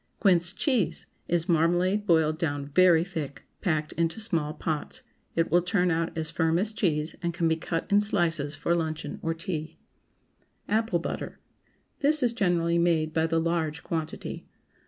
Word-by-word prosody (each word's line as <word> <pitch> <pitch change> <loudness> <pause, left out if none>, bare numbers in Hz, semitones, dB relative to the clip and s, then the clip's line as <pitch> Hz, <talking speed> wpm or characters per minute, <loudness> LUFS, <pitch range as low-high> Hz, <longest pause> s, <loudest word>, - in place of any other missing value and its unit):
QUINCE 175 -2 +3
CHEESE 240 - 0 0.2
Is 175 0 0
marmalade 175 +4 +2
boiled 160 -2 +3
down 145 -4 -2
very 175 -1 +6
thick, 160 -7 -6 0.2
packed 155 -5 0
into 165 +5 -1
small 165 -9 0
pots. 155 - -2 0.3
It 165 0 +1
will 175 - +5
turn 180 0 +1
out 165 +1 -1
as 160 0 -1
firm 165 0 +1
as 210 +4 0
cheese, 155 -6 0
and 170 -1 -2
can 170 -2 +1
be 160 - +3
cut 165 +1 -3
in 205 +1 +5
slices 165 -8 +1
for 150 +4 0
luncheon 160 -2 -3
or 165 0 -1
tea. 165 -2 -5 0.9
APPLE 220 -3 +1
BUTTER. 170 - -5 0.6
This 295 0 +3
is 240 -1 +2
generally 170 -6 +1
made 160 -2 +2
by 160 0 +2
the 165 0 +1
large 160 -2 -1
quantity. 160 -1 -4
165 Hz, 160 wpm, -27 LUFS, 160-180 Hz, 0.9 s, very